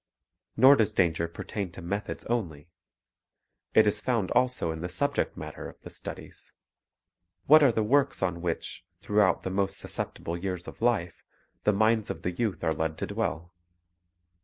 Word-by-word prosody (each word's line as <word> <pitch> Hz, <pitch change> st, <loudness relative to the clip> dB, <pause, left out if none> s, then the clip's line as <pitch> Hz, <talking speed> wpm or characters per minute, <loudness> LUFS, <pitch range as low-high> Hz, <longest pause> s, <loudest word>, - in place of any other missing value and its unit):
Nor 135 Hz, +2 st, +8 dB
does 110 Hz, -4 st, +1 dB
danger 85 Hz, -2 st, +1 dB
pertain 90 Hz, +3 st, -5 dB
to -, -, -10 dB
methods 100 Hz, +4 st, -4 dB
only. 85 Hz, -9 st, -3 dB, 1.0 s
It 110 Hz, -, +7 dB
is 105 Hz, 0 st, +2 dB
found 115 Hz, -7 st, 0 dB
also 125 Hz, -10 st, +1 dB
in 80 Hz, 0 st, -6 dB
the 90 Hz, -, -3 dB
subject 90 Hz, -, -1 dB
matter -, -, -7 dB
of -, -, -16 dB
the -, -, -10 dB
studies. -, -, -9 dB, 0.9 s
What 155 Hz, +2 st, +8 dB
are 140 Hz, -4 st, +6 dB
the 110 Hz, -1 st, 0 dB
works 135 Hz, 0 st, +2 dB
on 85 Hz, -2 st, -1 dB
which, 85 Hz, -1 st, -4 dB, 0.2 s
throughout 105 Hz, -2 st, +2 dB
the 95 Hz, -, -3 dB
most 95 Hz, 0 st, 0 dB
susceptible 85 Hz, -, -3 dB
years 90 Hz, 0 st, -4 dB
of -, -, -10 dB
life, 110 Hz, -8 st, 0 dB, 0.4 s
the 105 Hz, -, +5 dB
minds 110 Hz, +1 st, +2 dB
of -, -, -5 dB
the 90 Hz, -, -1 dB
youth 105 Hz, +1 st, -2 dB
are 80 Hz, -, +2 dB
led 80 Hz, 0 st, -2 dB
to -, -, -2 dB
dwell? 85 Hz, +2 st, -3 dB
95 Hz, 165 wpm, -28 LUFS, 85-110 Hz, 1.0 s, Nor